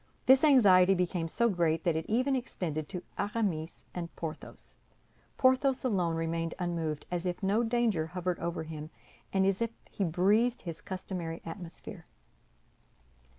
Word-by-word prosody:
This 265 +2 +6
anxiety 195 -10 +6
became 175 -2 -1
so 235 +8 +2
great 170 -5 +1
that 170 -3 +1
it 160 - -2
even 255 +5 +2
extended 160 - -3
to 180 -2 -5 0.2
Aramis 200 -7 -2
and 170 -2 -4
Porthos. 160 -2 -8 0.6
Athos 260 0 +3
alone 180 -9 +1
remained 165 0 -2
unmoved, 165 -4 -2
as 175 +1 -2
if 180 +3 -3
no 200 +4 +2
danger 225 -8 +1
hovered 180 +1 -3
over 170 -1 -3
him, 155 -1 -7 0.4
and 190 0 +2
as 195 +2 +1
if 230 - +1 0.2
he 200 - -2
breathed 205 +8 +2
his 165 -3 -6
customary 180 -3 -5
atmosphere. 175 +1 -8
180 Hz, 145 wpm, -30 LUFS, 165-220 Hz, 0.6 s, This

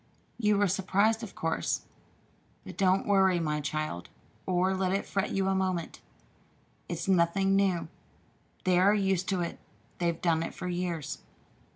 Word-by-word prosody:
"You 210 -2 +3
were 205 0 +3
surprised, 200 +4 +2
of 220 -4 -8
course. 165 0 -1 0.8
But - - -9
don't 190 -1 +2
worry, 190 -3 +4
my 150 -2 -1
child, 150 - -3 0.4
or 185 +1 +2
let 185 -1 0
it 195 +1 0
fret 195 0 -1
you 195 0 0
a 195 - +2
moment. 185 -3 -2 0.9
It's 170 +1 -4
nothing 190 +1 +3
new. 190 -4 +1 0.8
They 180 -1 +3
are 200 +3 +5
used 190 -2 0
to 190 -2 0
it. 170 - -4 0.4
They 175 - +1
have 170 -1 -1
done 165 -2 +2
it 165 - -4
for 180 - -5
years." 175 -4 -3
185 Hz, 160 wpm, -29 LUFS, 170-195 Hz, 0.9 s, are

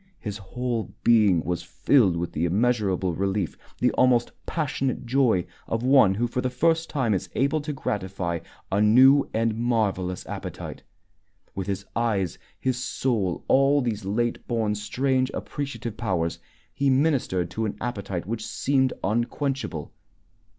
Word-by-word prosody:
His 105 -3 -5
whole 120 +3 -4
being 105 -8 +5
was 90 0 -2
filled 90 +2 +3
with 85 0 -3
the 80 - -1
immeasurable 95 -2 +1
relief, 95 0 -1 0.2
the - - +2
almost 125 -2 +3 0.2
passionate 135 -5 -2
joy, 120 -8 +2 0.2
of 115 +1 -2
one 130 -7 +5
who 120 +4 +1
for 120 +1 -2
the 130 - 0
first 165 +5 +1
time 130 -7 +1
is 95 - -2
able 140 +4 +1
to 150 +1 -4
gratify 95 - -3 0.3
a 100 +2 +2
new 130 +6 +6
and 115 0 0
marvelous 105 -6 0
appetite. - - -6 0.7
With 95 0 -4
his 100 0 -3
eyes, 105 -7 0 0.2
his 130 -1 -1
soul, 115 -8 -1
all 140 +2 +4
these 110 -4 -2
late 115 +5 -1
born, 110 -3 0
strange, 130 +5 0
appreciative 135 -6 -5
powers, 85 -7 -1 0.3
he 140 0 +1
ministered 130 - +1
to 110 - -2
an 105 - -5
appetite 100 -7 -4
which 110 +2 -3
seemed 130 +1 +1
unquenchable. 120 - -2
115 Hz, 145 wpm, -25 LUFS, 95-130 Hz, 0.7 s, new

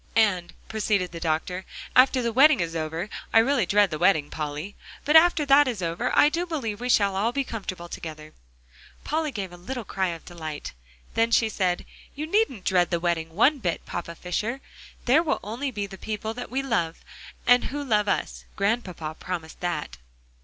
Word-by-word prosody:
"And," 200 -6 +2
proceeded 205 -4 0
the 170 - -7
doctor, 165 +3 -1 0.3
"after 255 0 +5
the 235 -1 -1
wedding 275 0 +6
is 170 -1 -2
over 160 +3 -3 0.2
I - - +4
It - - +9
really 255 -6 +1
dread 205 -1 +4
the 155 - -3
wedding, 165 -5 +3
Polly 150 +5 -5 0.3
but 300 - +2
after 320 -2 +6
that 280 +1 +6
is 225 -7 -2
over, 165 0 -1
I - - +7
do 340 +4 -1
believe 235 -10 -3
we 250 - -2
shall 200 -5 +3
all 215 +5 +1
be 275 +2 0
comfortable 190 -8 -6
together!" 155 -2 -8 0.7
Polly 310 0 -1
gave 195 -7 -5
a 175 - -11
little 245 +7 -5
cry 190 -1 -1
of 165 -2 -6
delight. 155 -4 -7 0.4
Then 230 0 +2
she 230 -1 +3
said, 185 -4 -1 0.3
"You 300 +2 -3
needn't 330 - 0
dread 180 -2 +3
the 170 - 0
wedding 165 -1 -1
one 270 - +4
bit, 175 -7 -2
Papa 170 -1 -5
Fisher. 215 +9 -3 0.5
There 270 +6 +5
will 320 -3 +1
be - - -15
only 235 +7 -3 0.2
the 190 -1 -11
people 220 0 -4
that 245 +1 -7
we 270 +2 -1
love, 175 -11 -1 0.4
and 245 0 +5
who 290 +1 -4
love 210 -6 +1
us - - -2
Grandpapa 190 -7 -2
promised 170 -3 -6
that." 175 - -3
205 Hz, 190 wpm, -25 LUFS, 175-250 Hz, 0.7 s, It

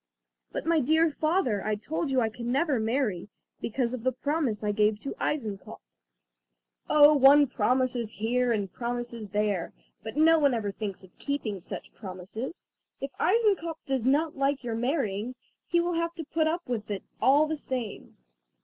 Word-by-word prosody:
"But, - - -4
my 330 -1 +3
dear 315 +4 +3
father, 310 - 0
I 215 0 0
told 300 +8 -3
you 260 -2 +2
I 225 - +1
can 235 +2 -5
never 275 -1 +2
marry, 220 -5 -1 0.3
because 235 +1 -1
of 255 - -4
the 260 +2 +1
promise 255 -4 -1
I 210 - +1
gave 210 0 +2
to 275 - -4
Eisenkopf." 220 -10 -3 1.1
"Oh, 300 0 +7
one 285 +1 +7
promises 250 -1 0
here 240 +3 0
and 205 -5 -1
promises 240 -2 -4
there, 205 -3 -1 0.3
but 220 +5 -7
no 325 +1 +6
one 280 -4 +3
ever 210 -3 -2
thinks 195 -1 -6
of 185 - -17
keeping 245 -9 -3
such - - -8
promises. 200 - -7 0.3
If 275 0 -4
Eisenkopf 385 -6 +2
does 265 -3 -1
not 295 +4 +2
like 275 0 0
your 235 -2 -3
marrying, 240 -2 -1 0.3
he 345 - +2
will 350 +1 0
have 335 0 -1
to 330 - -5
put 315 +1 0
up 340 +2 -1
with 230 -4 -3
it 200 -2 -3 0.2
all 285 +4 +5
the 315 +1 -2
same! 255 -7 -5
255 Hz, 170 wpm, -28 LUFS, 215-300 Hz, 1.1 s, Oh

